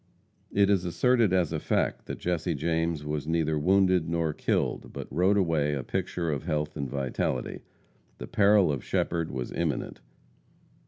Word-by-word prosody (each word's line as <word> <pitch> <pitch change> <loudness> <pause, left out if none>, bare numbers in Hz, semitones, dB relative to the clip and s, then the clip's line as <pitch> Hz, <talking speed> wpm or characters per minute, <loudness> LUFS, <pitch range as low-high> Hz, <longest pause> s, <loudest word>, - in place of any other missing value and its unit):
It 100 0 +3
is 95 -3 +2
asserted 115 +4 +2
as 90 -4 +1
a - - -1
fact, - - -1
that - - -5
Jesse 85 -1 -1
James 80 0 -1
was 75 0 -3
neither 80 -2 +1
wounded 90 0 +3
nor 85 -2 0
killed, - - -1
but - - -7
rode 90 +7 +3
away 80 -6 +1
a 65 - -3
picture 85 +5 -2
of 70 - -2
health 75 -2 -2
and 70 -3 -3
vitality. 65 -2 -2 0.6
The - - -6
peril 100 -4 +4
of 70 -4 -3
Shepherd 85 -1 -1
was 65 -1 -4
imminent. 80 -8 -3
80 Hz, 160 wpm, -28 LUFS, 75-90 Hz, 0.6 s, peril